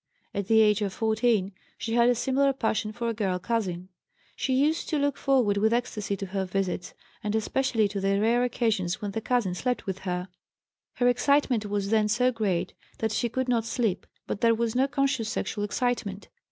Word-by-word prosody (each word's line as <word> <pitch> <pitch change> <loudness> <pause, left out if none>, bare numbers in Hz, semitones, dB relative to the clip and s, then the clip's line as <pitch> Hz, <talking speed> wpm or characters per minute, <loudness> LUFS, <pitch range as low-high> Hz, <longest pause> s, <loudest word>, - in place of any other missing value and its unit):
At 200 -2 -3
the 220 0 +5
age 210 -1 +4
of 200 -2 -1
14 220 -3 +1 0.3
she 225 - -4
had 240 0 +5
a 245 - +3
similar 270 +3 +2
passion 220 -4 -1
for 235 +2 -4
a 230 - 0
girl 195 -4 -1
cousin; 185 -4 -2 0.5
she 260 - 0
used 300 +5 +1
to 310 - +1
look 285 -1 +1
forward 250 -7 +2
with 220 +2 +3
ecstasy 215 -4 -1
to 195 - -4
her 190 0 -2
visits, 185 -1 -3 0.3
and 210 +1 -1
especially 225 0 +1
to 200 -1 -4
the 195 0 +2
rare 235 +3 +3
occasions 220 -7 0
when 205 -1 -4
the 225 - -3
cousin 235 -6 0
slept 250 +7 -2
with 190 -1 -3
her; 180 -1 -3 0.6
her 245 - +1
excitement 245 -3 +2
was 205 0 -2
then 215 -1 +3
so 250 +4 +2
great 205 -7 -1 0.2
that 220 -1 -1
she 235 +2 0
could 260 +3 -2
not 235 -2 +2
sleep, 225 -4 -1 0.2
but 200 - -4
there 230 -1 +4
was 230 0 -1
no 260 +2 +2
conscious 275 -5 0
sexual 225 -3 -2
excitement. 210 -2 -2
220 Hz, 195 wpm, -27 LUFS, 200-245 Hz, 0.6 s, the